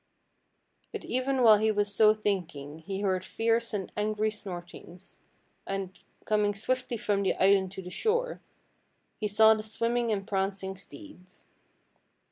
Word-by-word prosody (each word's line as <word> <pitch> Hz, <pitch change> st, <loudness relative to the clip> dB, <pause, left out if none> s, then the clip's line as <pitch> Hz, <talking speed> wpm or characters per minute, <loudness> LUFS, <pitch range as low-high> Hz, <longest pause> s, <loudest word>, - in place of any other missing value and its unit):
But -, -, -6 dB
even 255 Hz, +1 st, 0 dB
while 220 Hz, -2 st, +8 dB
he 220 Hz, +1 st, +2 dB
was 205 Hz, -1 st, 0 dB
so 215 Hz, +1 st, +5 dB
thinking 165 Hz, -8 st, -3 dB
he 195 Hz, +4 st, -5 dB
heard 185 Hz, -3 st, 0 dB
fierce 230 Hz, +3 st, 0 dB
and 200 Hz, -4 st, -4 dB
angry 215 Hz, +1 st, 0 dB
snortings, 180 Hz, -2 st, -9 dB, 0.5 s
and, 195 Hz, -1 st, -3 dB, 0.3 s
coming 210 Hz, -1 st, +1 dB
swiftly 250 Hz, +3 st, -2 dB
from 205 Hz, -2 st, 0 dB
the 195 Hz, -, +1 dB
island 190 Hz, -1 st, +3 dB
to 190 Hz, -, -7 dB
the 180 Hz, -, -8 dB
shore, 480 Hz, -, -1 dB, 0.8 s
he 215 Hz, -, -1 dB
saw 220 Hz, +2 st, +6 dB
the 215 Hz, -, -3 dB
swimming 230 Hz, +2 st, -1 dB
and 195 Hz, -1 st, -2 dB
prancing 195 Hz, -1 st, -2 dB
steeds. 190 Hz, -, -13 dB
205 Hz, 140 wpm, -29 LUFS, 190-220 Hz, 0.8 s, while